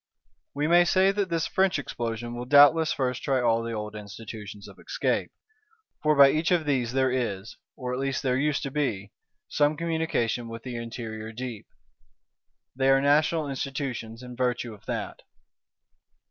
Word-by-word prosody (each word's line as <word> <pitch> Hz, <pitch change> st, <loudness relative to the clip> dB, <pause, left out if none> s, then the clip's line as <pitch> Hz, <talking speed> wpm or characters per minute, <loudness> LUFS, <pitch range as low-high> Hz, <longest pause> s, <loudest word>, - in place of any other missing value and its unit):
We 145 Hz, +1 st, 0 dB
may 175 Hz, +2 st, +6 dB
say 190 Hz, +2 st, +3 dB
that 200 Hz, -1 st, -1 dB
this 165 Hz, -2 st, 0 dB
French 190 Hz, -2 st, +2 dB
Explosion 120 Hz, -3 st, -4 dB
will 120 Hz, +1 st, -5 dB
doubtless 145 Hz, +4 st, +6 dB
first 130 Hz, -2 st, -1 dB
try 135 Hz, -2 st, +1 dB
all 115 Hz, -2 st, +2 dB
the 115 Hz, 0 st, -4 dB
old 105 Hz, -1 st, -5 dB
Institutions 105 Hz, 0 st, -9 dB
of -, -, -14 dB
escape; -, -, -1 dB, 0.7 s
for 155 Hz, 0 st, +3 dB
by 140 Hz, -1 st, +8 dB
each 160 Hz, +2 st, 0 dB
of 175 Hz, -3 st, +2 dB
these 125 Hz, -5 st, 0 dB
there 130 Hz, -1 st, +2 dB
is, 110 Hz, -5 st, -3 dB, 0.2 s
or 125 Hz, -1 st, -4 dB
at 125 Hz, -, -2 dB
least 135 Hz, 0 st, -2 dB
there 130 Hz, -2 st, +1 dB
used 145 Hz, +2 st, 0 dB
to 135 Hz, -, -4 dB
be, 110 Hz, -9 st, -2 dB, 0.4 s
some 150 Hz, +1 st, +1 dB
communication 160 Hz, -8 st, -1 dB
with 115 Hz, 0 st, -8 dB
the 125 Hz, -2 st, -6 dB
interior 115 Hz, -2 st, -6 dB
deep; 120 Hz, -2 st, -7 dB, 1.1 s
they 135 Hz, +1 st, +2 dB
are 135 Hz, 0 st, +5 dB
national 150 Hz, +2 st, +2 dB
Institutions 135 Hz, -4 st, -4 dB
in 125 Hz, 0 st, -9 dB
virtue 125 Hz, -2 st, -1 dB
of 105 Hz, -, -17 dB
that. -, -, -4 dB
130 Hz, 165 wpm, -26 LUFS, 115-150 Hz, 1.1 s, by